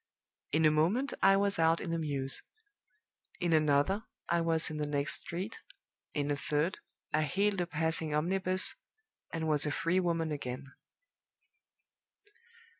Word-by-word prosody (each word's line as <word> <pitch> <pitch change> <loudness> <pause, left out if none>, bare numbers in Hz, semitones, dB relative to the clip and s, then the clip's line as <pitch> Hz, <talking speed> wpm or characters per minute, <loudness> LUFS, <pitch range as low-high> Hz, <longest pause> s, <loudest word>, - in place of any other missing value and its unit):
In 160 +2 +3
a 155 - +6
moment 190 - +1
I 195 0 +6
was 200 -2 +1
out 165 +1 +4
in 170 - -4
the 165 - 0
mews; 140 -3 -2 1.0
in 175 -1 +1
another, 155 +7 +2 0.2
I 170 0 +2
was 165 -1 +2
in 155 - -4
the 150 -1 -2
next 145 0 -1
street; 185 +6 -5 0.6
in 145 -1 0
a - - +2
third, 150 +4 -1 0.3
I 155 - +3
hailed 195 +5 +1
a 175 - -1
passing 160 -1 -1
omnibus, 185 +4 +2 0.6
and 160 -1 -2
was 150 -1 +2
a - - 0
free 170 +5 +1
woman 165 -3 0
again. 135 -1 -5
160 Hz, 145 wpm, -32 LUFS, 150-180 Hz, 1.0 s, a